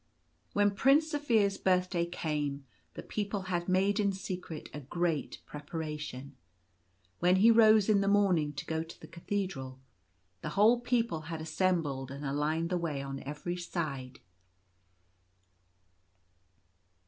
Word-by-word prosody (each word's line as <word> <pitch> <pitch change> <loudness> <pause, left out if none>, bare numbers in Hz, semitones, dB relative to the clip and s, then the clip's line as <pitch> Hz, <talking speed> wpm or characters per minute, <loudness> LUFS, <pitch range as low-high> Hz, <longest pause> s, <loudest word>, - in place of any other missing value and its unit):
When 205 0 +3
Prince 280 +9 +3
Zaphir's 225 -9 +2
birthday 180 -2 +1
came, 150 -5 -3 0.3
the - - -7
people 205 -2 -3
had 175 +1 -1
made 195 +3 +2
in 200 -1 +2
secret 180 -4 -6
a 150 - -5
great 160 +2 -2
preparation. 150 -3 -6 0.8
When 180 +1 +4
he 215 +5 +6
rose 220 -2 +6
in 210 -2 +4
the 200 - 0
morning 190 -7 +3
to 135 - -6
go 160 0 -1
to 165 0 -10
the - - -11
Cathedral, 170 -8 -4 0.6
the - - -4
whole 225 +4 +6
people 235 -8 0
had 165 -2 -4
assembled 155 -5 -1
and 140 +2 -7
lined 160 +4 0
the 180 - +1
way 150 -5 -2
on 135 0 -5
every 150 +5 -4
side. 145 -7 -4
175 Hz, 130 wpm, -31 LUFS, 150-200 Hz, 0.8 s, he